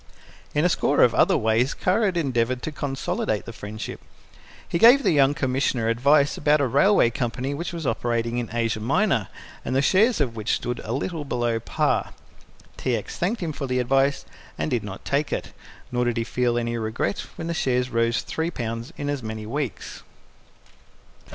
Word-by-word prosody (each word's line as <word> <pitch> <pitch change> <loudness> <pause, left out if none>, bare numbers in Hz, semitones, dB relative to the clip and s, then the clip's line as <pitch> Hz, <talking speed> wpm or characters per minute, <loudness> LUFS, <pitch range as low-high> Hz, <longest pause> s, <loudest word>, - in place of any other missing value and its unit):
In 150 +3 +3
a - - +4
score 145 -4 +3
of 120 - +4
other - - +4
ways 110 +5 +1
Kara 205 +4 +1
had 185 -3 0
endeavoured 125 -5 0
to 155 - -3
consolidate 135 -7 -2
the 115 - -8
friendship. 105 0 -7 0.7
He 170 - -1
gave 245 +7 +7
the - - +3
young 140 -2 +4
Commissioner 130 -4 0
advice 140 +5 +3
about 150 +1 +3
a 140 - +2
railway 140 - +4
company 125 +4 -2
which 170 +5 -4
was 165 -3 -5
operating 115 0 -1
in 120 - -4
Asia 115 -2 -1
Minor, 120 - +1 0.4
and 130 - -2
the 135 - +4
shares 215 - +4
of 125 -6 0
which 110 -1 0
stood 120 0 -4
a 110 - -5
little 155 +5 -2
below 120 -4 -1
par. - - -1 0.6
T. - - 0
X. - - -5
thanked 195 +6 -1
him 160 -2 -2
for 140 - -4
the 125 0 -1
advice, 135 +3 +1 0.3
and - - -2
did 120 -4 0
not 100 -2 -8
take 140 +1 0
it, - - -4 0.4
nor 125 0 0
did 120 -1 0
he 115 - +1
feel 120 0 0
any 120 0 -1
regret 110 -3 -2 0.2
when 165 - -6
the 170 - -2
shares 125 -4 0
rose 115 0 +1
3 160 +1 -2
pounds 115 -5 -5
in 145 - -4
as 145 -2 -2
many 110 -1 -6
weeks. 135 +1 -4
125 Hz, 190 wpm, -24 LUFS, 115-145 Hz, 0.7 s, gave